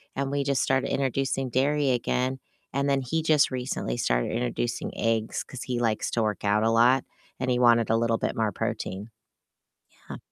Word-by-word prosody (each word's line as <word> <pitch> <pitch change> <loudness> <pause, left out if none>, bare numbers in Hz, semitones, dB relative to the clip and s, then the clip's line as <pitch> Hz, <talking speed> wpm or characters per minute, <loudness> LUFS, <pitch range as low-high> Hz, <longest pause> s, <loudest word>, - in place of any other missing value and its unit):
and 135 0 -1
we 140 0 0
just 135 -3 +1
started 135 0 +1
introducing 135 0 -1
dairy 140 +3 +1
again, 130 +1 0 0.3
and 140 +1 0
then 135 -1 +2
he 155 +6 -2
just 155 -3 +4
recently 125 - -3
started - - 0
introducing 120 0 -2
eggs 115 -1 -1
'cause 130 - -8
he 125 -2 -2
likes 115 -3 0
to 115 - 0
work 105 -2 -2
out 105 +1 +2
a 110 - +2
lot 120 +3 +4 0.4
and 130 -1 -1
he 125 - +2
wanted 115 -2 +4
a 115 - +3
little 115 -1 +1
bit - - -2
more 110 -2 0
protein. 100 +4 -4 1.0
Yeah. - - -7
125 Hz, 185 wpm, -26 LUFS, 115-135 Hz, 1.0 s, just